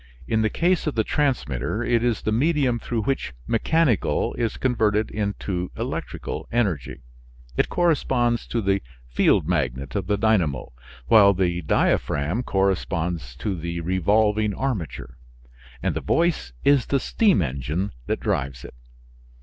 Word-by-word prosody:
In 110 -1 +1
the 110 - +2
case 175 +3 +1
of 150 - -1
the 110 - +2
transmitter 105 - -1
it 120 -1 +1
is 120 -2 0
the 110 - 0
medium 135 0 +2
through 115 -2 -2
which 135 - -2
mechanical 135 - +1
is 115 -2 -2
converted 110 -4 +1
into 100 -3 -3
electrical - - -4
energy. 95 - -1 0.5
It - - +1
corresponds 130 -9 +1
to 115 -2 -2
the 95 0 +1 0.3
field - - +2
magnet 70 -6 -1
of 95 - -2
the 105 0 +1
dynamo, 90 - +1 0.3
while 100 - +6
the 90 -1 0
diaphragm 75 - +1
corresponds 90 - -1
to 100 -3 -3
the 85 0 -4
revolving 105 +4 +2
armature, 85 - -4 0.6
and - - 0
the - - -2
voice 165 - +1
is 140 -4 +4
the 140 - +2
steam 195 - +2
engine 75 +8 -2 0.2
that - - -1
drives 65 -2 -2
it. - - -10
105 Hz, 140 wpm, -24 LUFS, 85-120 Hz, 0.6 s, while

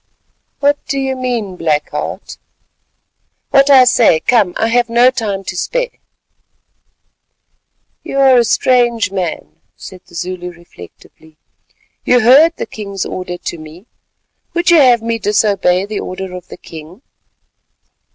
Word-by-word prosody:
"What 285 0 +1
do 275 - -2
you 265 -1 -2
mean, 240 -7 -3
Black 155 -3 -1
Heart?" - - -6 1.1
"What 275 0 +4
I 265 -2 +7
say. 235 -9 +3
Come, 200 -1 +1
I 225 - 0
have 240 0 +1
no 240 +2 +4
time 210 -6 -4
to 185 - -6
spare." - - -2 2.1
"You - - -6
are 265 -2 +5
a - - +3
strange 240 -2 +1
man," 185 -4 -5
said 185 -1 -12
the - - -17
Zulu 180 +1 -5
reflectively. 160 - -17 0.7
"You 245 0 +3
heard 290 +9 +5
the - - -4
king's 200 -3 -6
order 180 -1 -6
to 170 - -7
me: 155 +5 -13 0.7
would 345 +1 +2
you 340 - +6
have 245 -4 +4
me 230 0 -2
disobey 200 -3 +1
the 210 0 -5
order 185 0 -6
of 180 -1 -10
the - - -11
king?" 165 - -13
215 Hz, 140 wpm, -15 LUFS, 180-255 Hz, 2.1 s, I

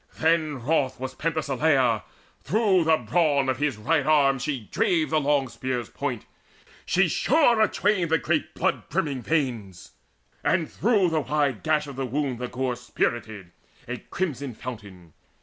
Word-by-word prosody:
Then 160 -3 +1
wroth 135 -3 0
was 130 0 -5
Penthesileia; 140 -7 +1 0.4
through 195 -5 +2
the 160 0 +4
brawn 140 +2 +1
Of 130 0 -1
his 145 -5 0
right 145 +8 +1
arm 140 -2 +3
she 130 -5 -3
drave 160 -3 +1
the 155 - +3
long 140 -1 +2
spear's 125 +1 -4
point, 130 -6 -4 0.6
She 190 0 +3
shore 250 - +3
atwain 205 -3 +2
the 160 - +4
great 135 - -1
blood - - -1
brimming 140 -5 -1
veins, 115 - -2 0.5
And 170 -3 +1
through 205 -6 +2
the 160 -1 +1
wide 145 -5 0
gash 155 -1 +1
of 140 -3 -9
the 135 -1 -2
wound 135 -1 -2
the 125 - -3
gore 125 0 -2
Spirted, 110 -5 -3 0.4
a 125 +1 -4
crimson 140 -9 -4
fountain. 100 -10 -9
140 Hz, 150 wpm, -25 LUFS, 125-160 Hz, 0.6 s, the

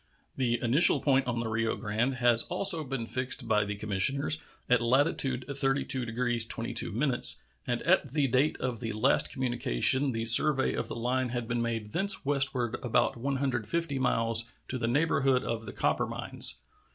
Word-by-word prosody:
The 120 -3 -1
initial 135 +9 +4
point 135 -2 0
on 120 -1 -2
the 115 - -4
Rio 110 0 -2
Grande 120 +4 -2
has 120 -2 +3
also 190 -5 +2
been 135 -4 -5
fixed 130 0 -1
by 105 -2 +1
the 100 0 -5
commissioners, 125 +10 +1 0.3
at 125 -1 +2
latitude 130 0 +1
32 135 -2 0
degrees 120 0 -2
22', 115 +1 0 0.6
and - - -3
at - - +1
the 145 0 0
date 130 +5 0
of 125 -4 -4
the 115 0 -5
last 75 -8 +2
communication 130 - +1
the 115 -1 -4
survey 135 +4 +4
of - - -4
the - - -6
line 125 +2 -2
had 120 -1 -5
been 120 0 -2
made 115 -2 -4
thence 195 -2 +2
westward 135 -4 0
about 120 +1 0
150 135 +3 -3
miles 115 -2 +1 0.2
to 130 - -5
the 115 - -2
neighborhood 135 -1 0
of 115 -1 -5
the - - -6
copper - - -1
mines. - - -1
125 Hz, 165 wpm, -28 LUFS, 115-135 Hz, 0.6 s, initial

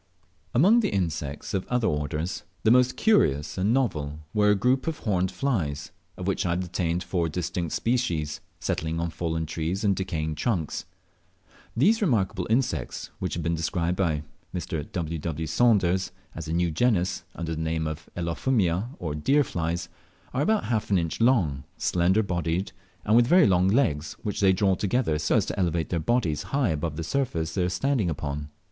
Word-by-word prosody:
Among 195 - +6
the 230 - +1
insects 80 -7 -2
of 95 -2 -1
other 125 -2 +1
orders, 75 +2 -1 0.2
the 110 - +5
most 125 +1 +4
curious 75 - +3
and 95 +4 +1
novel 80 - 0 0.2
were 105 -1 +4
a 105 - +5
group 125 +8 +1
of 160 -1 -1
horned 95 -4 0
flies, 80 - -2 0.3
of 90 - -5
which 95 - 0
I 85 - +1
obtained 90 -1 -1
four 85 -2 -1
distinct 85 0 -3
species, 85 -12 -1 0.2
settling 80 +1 -2
on 85 0 -2
fallen 80 -1 -2
trees 80 +6 -3
and 100 -2 +3
decaying 80 -4 -2
trunks. 80 - -2 0.9
These 215 - +4
remarkable 100 - +1
insects, 120 +3 -1
which 90 - -2
have 85 - -3
been 85 +1 0
described 85 +2 -1
by 80 -5 0 0.3
Mr. 80 -4 -4
W. 85 -2 -3
W. 80 0 -3
Saunders 95 0 +2 0.2
as 80 -1 -6
a - - -3
new 85 0 +1
genus, 95 0 +1
under 85 -1 -3
the 80 - -3
name 80 0 -1
of 80 0 -5
Elaphomia 90 +3 0
or 80 -4 -4
deer 135 - +3
flies, 85 -5 -2 0.5
are 130 - 0
about 215 +7 +2
half 110 -3 -1
an 100 - +4
inch 85 +4 -2
long, 90 - +3
slender 90 +5 +2
bodied, 85 -1 -1 0.3
and 105 - +3
with 120 0 +6
very 180 +3 +6
long 90 -1 +4
legs, 95 - +1
which 105 - -2
they 95 -1 +6
draw 95 +1 +3
together 100 -4 0
so 75 - +1
as - - +3
to - - -4
elevate 85 -3 0
their 85 - 0
bodies 80 -5 +1 0.2
high 130 -7 +2
above 80 0 -2
the 85 - -4
surface 80 -6 -1
they 95 - 0
are 90 - +1
standing 125 -1 +1
upon. 75 -1 -4
90 Hz, 180 wpm, -26 LUFS, 80-110 Hz, 0.9 s, Among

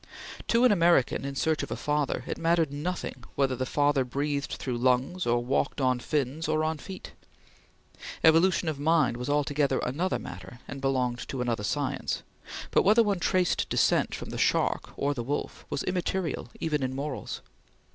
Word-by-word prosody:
To 235 +2 +4
an 250 - +6
American 170 -10 +3
in 140 0 -4
search 160 +2 +1
of - - -5
a - - -2
father, 150 -2 -1
it - - -4
mattered 165 -3 +2
nothing 150 -4 -4
whether 135 -2 +1
the 130 +1 -2
father 145 -1 +2
breathed 140 +3 -2
through 125 -3 -3
lungs, 130 +8 +1
or 120 0 +1
walked 140 +3 0
on 130 -2 +2
fins, 150 +3 -1
or 155 0 +1
on 160 -1 -1
feet. 190 +4 -9 1.1
Evolution 165 +2 +5
of 155 -3 -2
mind 155 -3 +3
was 125 +3 -4
altogether 145 -1 +1
another 165 +9 0
matter 120 - -9
and 135 - -7
belonged 130 -3 0
to 135 - -5
another 120 -4 -1
science, - - -2 0.5
but - - +4
whether 215 +4 +5
one 200 -4 0
traced 185 0 +1
descent - - +2
from - - -7
the - - -4
shark - - +1
or 145 +1 +1
the 125 - -4
wolf 140 +5 -4
was - - -2
immaterial 180 -6 -2
even 150 -3 0
in 130 0 -2
morals. 135 -6 -4
145 Hz, 175 wpm, -28 LUFS, 130-165 Hz, 1.1 s, an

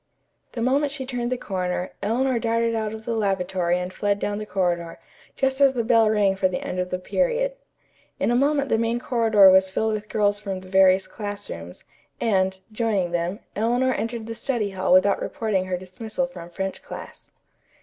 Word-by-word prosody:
The 230 - -2
moment 275 +3 +2
she 275 -2 -4
turned 245 -1 -3
the 255 - 0
corner, 180 -4 -3
Eleanor 240 +4 +1
darted 230 0 +1
out 220 -1 -1
of 220 0 -8
the 235 - -1
lavatory 190 -4 0
and 180 +1 -4
fled 205 0 0
down 205 0 -2
the 215 - -6
corridor, 175 -3 -1 0.4
just 270 +1 0
as 275 -1 +6
the 240 -3 -1
bell 225 -1 +4
rang 205 -3 +2
for 190 0 +2
the 180 -1 -3
end 180 - -4
of 180 0 -1
the 180 - -1
period. - - 0 0.7
In - - +1
a - - +2
moment 280 +2 +2
the 225 - +2
main 230 +1 0
corridor 225 -6 +5
was 190 0 +5
filled 220 +3 0
with 210 0 -5
girls 205 -1 +1
from 195 -3 -5
the 185 - -13
various 190 0 +5
classrooms, 205 - -7 0.4
and, 190 -3 +1
joining 215 -5 0
them, 175 +4 -2
Eleanor 245 +4 +1
entered 230 -1 -3
the 230 - -5
study 225 -3 -2
hall 190 -1 -1
without 185 +2 +5
reporting 215 -8 -1
her 185 -1 -2
dismissal 215 +8 -4
from 175 -10 -10
French 190 +2 -4
class. - - -10
210 Hz, 190 wpm, -24 LUFS, 185-235 Hz, 0.7 s, as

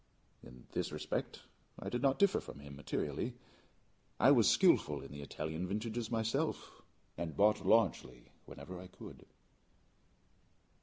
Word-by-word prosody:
In 60 -1 -14
this - - -2
respect 75 0 -4 0.3
I - - -7
did 120 - -2
not 135 0 +3
differ 200 -1 +3
from - - -10
him 70 0 -10
materially: 70 0 -3 0.8
I - - +7
was - - +6
skillful 75 -1 +4
in 70 - -10
the 70 0 -7
Italian 80 +5 -4
vintages 110 +3 -3
myself, 115 -1 -2 0.4
and 85 -2 -4
bought 105 +2 +4
largely 70 - +1 0.2
whenever 90 -1 -9
I 90 - -9
could. - - -12
90 Hz, 135 wpm, -35 LUFS, 70-110 Hz, 0.8 s, I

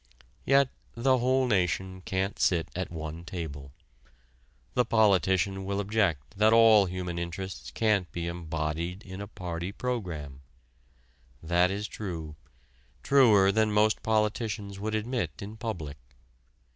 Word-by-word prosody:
Yet 135 0 +4 0.3
the 130 +2 +3
whole 130 +2 +2
nation 95 -3 0
can't 95 +1 -2
sit 85 -3 +2
at 95 0 -3
one 80 0 -6
table: 80 -6 -6 1.0
the 125 - +3
politician 95 -4 +2
will 100 +1 -2
object 100 - -1
that 110 +1 +5
all 110 -3 +7
human 90 -1 -4
interests 90 +2 -5
can't 105 -5 +1
be 85 -1 -4
embodied 85 +2 -3
in 95 0 -8
a 100 - -6
party 90 -2 -5
program. 85 - -4 1.0
That 90 +2 +3
is 100 +2 -3
true, 80 -9 -6 0.7
truer 110 -8 +5
than 110 0 +2
most 105 +1 +3
politicians 105 -2 -1
would 110 +2 -2
admit 110 - -2
in 105 +2 -7
public. 90 - -5
95 Hz, 125 wpm, -28 LUFS, 85-110 Hz, 1.0 s, all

